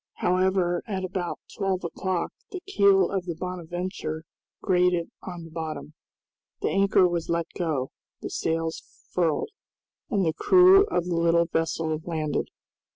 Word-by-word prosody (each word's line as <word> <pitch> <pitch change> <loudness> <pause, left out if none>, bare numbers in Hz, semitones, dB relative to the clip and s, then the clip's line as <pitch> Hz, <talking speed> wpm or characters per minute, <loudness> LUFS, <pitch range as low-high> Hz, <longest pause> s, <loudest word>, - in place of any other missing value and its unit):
However, 185 -1 +1
at 190 -3 -3
about 180 -2 -4
twelve 195 -2 -1
o'clock 180 +1 -2 0.2
the 375 - -5
keel 200 - +4
of 190 -2 -2
the 170 - -3
"Bonadventure" 175 -2 -4 0.4
grated 180 -2 +2
on 175 -2 -7
the 165 - -11
bottom. 155 -1 -5 0.7
The - - 0
anchor 195 -1 +4
was 170 -2 -2
let 170 0 +1
go, 150 -7 -1 0.3
the - - -6
sails 165 0 -1 0.3
furled, 170 - 0 0.6
and 200 -5 +1
the 160 - +1
crew 375 - +6
of 175 - 0
the 175 -1 -1
little 170 0 +3
vessel 165 -1 -1
landed. 155 -3 -2
175 Hz, 140 wpm, -26 LUFS, 165-190 Hz, 0.7 s, crew